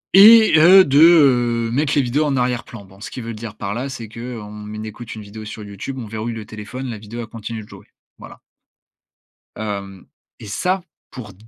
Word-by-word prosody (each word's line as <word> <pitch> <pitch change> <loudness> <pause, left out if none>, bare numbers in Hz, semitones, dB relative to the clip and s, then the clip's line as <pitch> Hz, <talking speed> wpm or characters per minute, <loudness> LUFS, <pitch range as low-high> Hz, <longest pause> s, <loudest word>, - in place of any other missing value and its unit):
et 220 +3 +8
heu, 185 +4 +8
de, 140 +1 +3
heu, 125 -8 +4
mettre 145 +4 0
les 145 - +3
vidéos 135 +5 0
en 140 -2 0
arrière-plan. 120 -4 -3
Bon, 95 +1 -19
ce - - -7
qu'ils 125 - -8
veulent 115 - -6
dire 105 -1 -8
par 100 -1 -5
là, 130 +4 -4
c'est 120 -4 -7
qu'on 110 -2 -8
écoute 110 +2 -8
une 110 - -9
vidéo 105 +2 -10
sur 105 0 -8
YouTube, 105 +6 -7
on 125 - -6
verrouille 110 +2 -5
le 110 -2 -7
téléphone, 110 +5 -8
la 115 -4 -6
vidéo 110 +3 -8
elle - - -6
continue 115 0 -7
de - - -17
jouer. - - -14 0.3
Voilà - - -12 1.2
hem 100 -3 -6 0.3
et - - -10
ça, 180 - -1 0.3
pour 110 -6 -9
115 Hz, 200 wpm, -20 LUFS, 105-135 Hz, 1.2 s, et